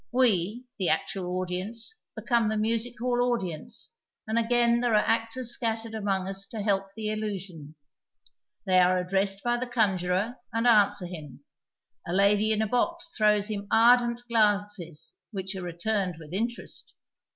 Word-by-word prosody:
We, 235 -1 +1
the 185 - +2
actual 180 -2 -1
audience, 185 - -3 0.2
become 235 -3 +1
the 215 0 0
music 230 +3 0
hall 245 0 +1
audience, 190 - -3 0.3
and 220 +1 0
again 235 0 +3
there 240 -2 +1
are 210 - +3
actors 230 +2 0
scattered 225 -2 -2
among 195 -3 -1
us 195 0 -4
to 225 - -8
heliD 200 -2 0
the 215 -1 -2
illusion. 190 -8 -5 0.9
They 185 -1 +4
are 180 0 +4
addressed 195 +2 0
by 240 0 +1
the 250 +1 -3
conjurer 205 -1 0
and 230 +1 -1
answer 205 -4 +4
him; 150 -6 -9 0.6
a 170 - -2
lady 205 +3 +4
in 220 0 +2
a - - -1
box 335 +9 -1
throws 210 -2 +3
him 205 -2 -3
ardent 240 +1 +4
glances 205 -8 0
which 195 -2 -5
are 190 - -5
returned 180 +2 -2
with 155 +1 -11
interest. 235 +5 -3
210 Hz, 150 wpm, -27 LUFS, 185-230 Hz, 0.9 s, They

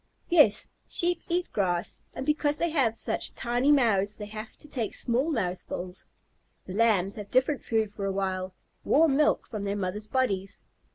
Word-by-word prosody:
Yes, 295 -12 +5 0.2
Sheep 350 0 +1
eat 350 +1 -1
grass, 180 -4 0
and 265 - -4
because 295 0 +1
they 340 0 0
have 250 -8 +1
such - - -2
tiny 245 +4 +1
mouths 210 -7 +3
they 210 - -6
have 215 +1 -8
to - - -12
take 240 -7 -3
small 250 +6 +1
mouthfuls. 180 - -4 0.6
The 185 - -7
Lambs 200 -3 +2
have 205 -1 -7
different 260 +3 +2
food 220 -2 0
for 200 -1 -5
a 195 - 0
while, 190 -1 -2 0.3
warm 305 -2 +4
milk 300 +2 +2
from 215 -3 -5
their 200 0 -1
mothers' 205 +2 -3
bodies. 200 -7 -1
220 Hz, 170 wpm, -28 LUFS, 195-275 Hz, 0.6 s, Yes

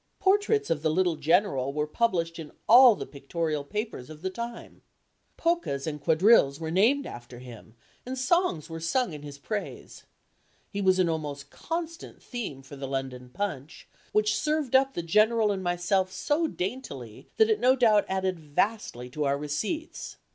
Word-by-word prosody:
Portraits 410 - +2
of 155 -3 0
the 160 - +1
little 175 +1 +2
General 150 -3 +2
were 150 +1 -1
published 170 -2 0
in 155 -2 -8 0.2
all 245 0 +9
the - - -6
pictorial 150 +1 -3
papers 210 - -5
of 155 +1 -11
the 190 - -2
time. 235 +3 -7 0.6
Polkas 335 - 0
and 150 -2 -4
quadrilles 160 -3 +4
were 160 -1 -4
named 240 +11 +3
after 120 +1 -9
him, 120 -2 -12 0.3
and 260 +1 -5
songs 255 - +1
were 165 -1 -6
sung 200 +5 0
in 150 - -8
his 145 -1 -9
praise. 205 +8 -6 0.7
He 200 - -3
was 185 -1 +4
an 185 -2 +3
almost 145 -4 -4
constant 330 0 -5
theme 200 - -6
for 140 +1 -11
the 135 0 -6
London 130 -2 -4
Punch, 150 -2 -5 0.2
which 215 0 +2
served 300 -4 0
up 270 +1 +4
the 170 - -2
General 215 +5 +3
and 195 -1 -2
myself 175 +2 0
so 295 - 0
daintily 180 - -6
that 220 0 +5
it 215 - +2
no 255 +3 +4
doubt 220 -5 +4
added 190 -2 -1
vastly 150 - -2
to 150 +2 -2
our 140 0 +1
receipts. 150 - -4
180 Hz, 170 wpm, -27 LUFS, 145-235 Hz, 0.7 s, all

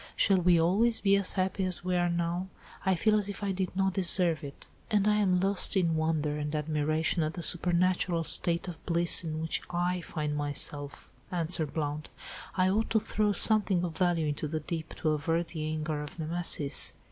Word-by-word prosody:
"Shall 195 -2 +3
we 175 -1 +3
always 210 +8 +2
be 200 -1 +3
as 200 -1 0
happy 190 0 -1
as 185 -2 -2
we 180 0 -1
are 175 0 +1
now? 170 +2 -2 0.4
I 190 0 +2
feel 215 +5 +1
as 205 -1 0
if 200 0 -7
I 200 - -1
did 185 -1 -3
not 190 0 0
deserve 180 -4 +2
it." 140 -1 -10 0.2
"And 210 -2 +1
I 210 0 +3
am 185 -3 +2
lost 195 +1 +2
in 170 -3 +1
wonder 155 -2 -1
and 150 +1 -4
admiration 155 +2 -1
at 155 0 -2
the 175 - -5
supernatural 175 0 +1
state 170 +2 +2
of 170 -3 -9
bliss 170 0 +2
in 155 -1 -4
which 160 0 -2
I 175 +1 -1
find 150 -3 -4
myself," 145 0 +1 0.2
answered 165 -3 -1
Blount. 150 0 -3 0.5
"I 185 0 +3
ought 210 +4 0
to 220 - +2
throw 210 -1 -1
something 205 -2 +4
of 170 -3 -4
value 175 -3 +1
into 150 +1 -3
the 155 +1 -4
deep, 160 +1 -6
to 155 - -2
avert 165 +3 -1
the 155 -2 -5
anger 155 -1 -3
of 150 +2 -9
Nemesis. 160 -3 0
170 Hz, 195 wpm, -29 LUFS, 155-185 Hz, 0.5 s, something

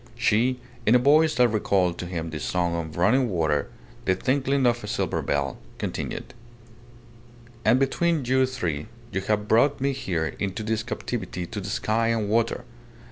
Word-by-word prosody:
She, 120 +1 +2 0.2
in 115 - +4
a - - +9
voice 150 +4 +4
that 125 0 +5
recalled 95 -5 +1
to 90 - -4
him 85 -2 -4
the 75 - -4
song 85 +3 0
of 80 -2 -5
running 120 +8 +3
water, 80 -5 0 0.4
the 95 - +3
tinkling 135 +5 +1
of 120 -1 +2
a - - -5
silver - - -1
bell, 70 -3 -1 0.2
continued - - -4 1.3
"And 125 - +4
between 155 +2 +1
you 130 +1 +3
three 85 - -3 0.2
you 95 -1 -1
have 105 +1 -1
brought 135 +7 +4
me 140 +1 +1
here 85 - -2
into 100 +1 -2
this 110 0 0
captivity 110 -5 -4
to 105 +2 -6
the 95 - -5
sky 110 +2 0
and 115 -3 0
water. 115 +1 +1
110 Hz, 170 wpm, -25 LUFS, 90-125 Hz, 1.3 s, a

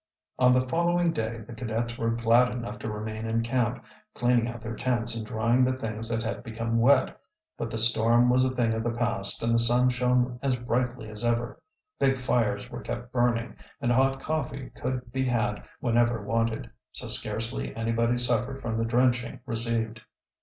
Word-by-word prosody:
On 125 -1 +5
the 130 0 +2
following 170 +3 +1
day 115 0 -3
the 120 - -10
cadets 115 0 -3
were 115 -1 -1
glad 115 +2 +3
enough 115 -4 -6
to 110 - -5
remain 110 +1 -5
in 115 +1 0
camp, 120 0 -1 0.3
cleaning 120 -1 +2
out 120 0 -7
their 115 0 -5
tents 120 -1 0
and 115 - -4
drying 115 +4 +1
the 130 +1 +2
things 115 -2 -4
that 115 -1 -1
had 115 - -4
become 115 +1 -2
wet. 130 +3 +3 0.3
But 115 - -4
the 115 - -4
storm 115 +1 +5
was 125 +1 +4
a 130 - +2
thing 115 -2 +1
of 110 0 -2
the 120 0 -1
past 110 -5 +3
and 115 0 +1
the 115 - +4
sun 120 +2 +5
shone 125 0 +1
as 135 -2 +1
brightly 120 -1 -2
as 105 +1 -7
ever. 120 +5 -1 0.4
Big 135 -1 +2
fires 110 -5 0
were 120 - -6
kept 120 0 -6
burning, 120 -1 0 0.2
and 120 - 0
hot 135 +2 +2
coffee 140 -3 -4
could 125 -1 -5
be 130 +1 -1
had 120 -1 -1 0.2
whenever 120 -2 +1
wanted, 115 +1 -1 0.2
so - - -2
scarcely 110 +3 0
anybody 115 +1 0
suffered 125 +2 0
from 115 -3 -3
the 115 - 0
drenching 120 0 +1
received. 115 -1 +1
120 Hz, 185 wpm, -27 LUFS, 115-125 Hz, 0.4 s, On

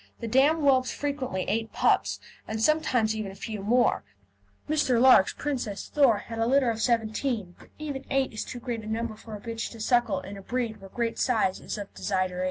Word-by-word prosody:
The 230 - -4
dam 280 +7 +4
whelps 260 -3 +3
frequently 270 -10 -3
eight 225 +2 -1
puppies, - - +2 0.3
and 220 0 -3
sometimes 245 -5 +2
even 215 -3 -4
a - - -12
few 215 0 -6
more. 240 +4 +2 0.6
Mr. 290 -6 +2
Larke's 250 -6 +7
Princess 245 -8 -3
Thor 275 -8 +4
had 225 +2 -7
a 225 - +2
litter 260 -1 +3
of 225 0 -4
seventeen, 225 -3 0
but - - -17
even 285 -3 -5
eight 270 -2 +1
is 215 - -3
too 245 - -7
great 235 -2 -4
a 215 - -10
number 225 0 -2
for 220 0 -9
a - - -8
bitch 230 +1 -4
to 230 - -11
suckle 240 0 +2
in 200 +2 -8
a - - -9
breed 235 +1 -2
where 195 - -11
great 230 +2 -2
size 220 -7 +1
is - - -5
a 205 - -4
desideratum. 185 -2 -1
230 Hz, 205 wpm, -27 LUFS, 215-260 Hz, 0.6 s, Larke's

